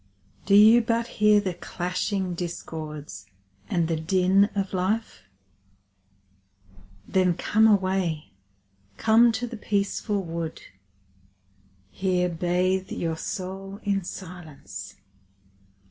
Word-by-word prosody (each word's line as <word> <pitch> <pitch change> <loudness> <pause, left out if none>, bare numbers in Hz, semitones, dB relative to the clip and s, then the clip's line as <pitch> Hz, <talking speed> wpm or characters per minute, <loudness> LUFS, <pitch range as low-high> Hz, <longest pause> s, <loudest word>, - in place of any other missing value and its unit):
Do 200 - +5
you 220 +3 +8
but 230 0 0 0.2
hear 210 0 +6
the 190 -3 -2
clashing 180 +2 -3
discords 155 - -6 0.4
and 170 -2 +1
the 165 - 0
din 185 +4 +3
of 195 -1 -2
life? 200 +5 -2 1.8
Then 185 -2 +2
come 220 +5 +3
away, 185 - +1 0.7
come 230 +2 +5
to 220 +2 -2
the 235 -1 -7
peaceful 200 0 -1
wood, 165 -1 -5 1.3
Here 180 -2 0
bathe 180 +2 0
your 165 -1 -2
soul 195 +3 -6
in 200 -2 0
silence. 155 - -9
185 Hz, 100 wpm, -25 LUFS, 170-205 Hz, 1.8 s, you